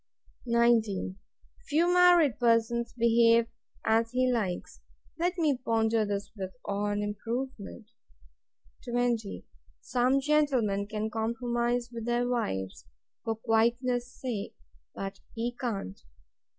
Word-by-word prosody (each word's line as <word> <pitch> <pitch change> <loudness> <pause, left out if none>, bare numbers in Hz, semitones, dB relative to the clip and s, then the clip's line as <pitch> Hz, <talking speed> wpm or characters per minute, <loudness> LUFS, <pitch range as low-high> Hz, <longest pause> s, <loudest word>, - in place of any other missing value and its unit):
19. 230 -5 +2 0.5
Few 315 +4 +3
married 350 -8 +5
persons 235 0 +2
behave 230 0 +5 0.4
as 225 +1 +3
he 255 +1 +1
likes. 195 -7 -3 0.4
Let 355 +2 0
me 310 -5 +2
ponder 225 -2 +2
this 200 0 -3
with 190 0 -6
awe 200 +1 -1
and 205 0 -1
improvement. 225 +1 -5 0.9
20. 240 -4 -1 0.3
Some 255 +2 +1
gentlemen 265 -9 +1
can 215 +1 -3
compromise 235 +1 -1
with 230 -1 -5
their 240 0 +1
wives, 95 - -3 0.4
for 225 - -1
quietness 240 +2 +1
sake; 240 -7 -5 0.4
but 195 0 -5 0.2
he 240 +1 -2
can't. 220 - -4
235 Hz, 110 wpm, -29 LUFS, 215-245 Hz, 0.9 s, married